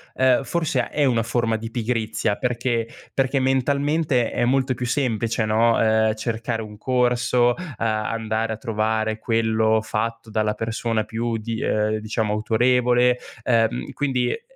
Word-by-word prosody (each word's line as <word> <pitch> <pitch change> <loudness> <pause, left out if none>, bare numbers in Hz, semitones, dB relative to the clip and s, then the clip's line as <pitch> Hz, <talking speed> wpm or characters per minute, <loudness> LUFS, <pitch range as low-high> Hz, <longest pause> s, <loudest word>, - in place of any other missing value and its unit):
ehm, 130 0 +3
forse 145 -3 -1
è 145 -1 +1
una 120 -4 +2
forma 115 -1 0
di 115 +1 -6
pigrizia, 110 -3 -1
perché 120 -2 -1 0.3
perché 135 0 +1
mentalmente 140 +1 +1
è - - 0
molto 130 +1 +2
più 125 0 -4
semplice, 115 -3 0
no, 115 +2 +3
ehm, 110 -1 +3
cercare 115 +1 -3
un 105 -1 -10
corso, 125 0 +2
uhm, 180 -4 -8
andare 110 0 -1
a - - -6
trovare 110 -1 -1
quello 110 -1 +2
fatto 115 +1 -3
dalla 105 -1 0
persona 115 0 -1
più 115 +1 -2
di 110 +1 -4
uhm, 110 0 +1
diciamo 110 0 -2
autorevole, 125 +3 +2 0.2
uhm, 115 0 +1
quindi 130 -3 0
è - - -4
115 Hz, 145 wpm, -23 LUFS, 110-125 Hz, 0.3 s, ehm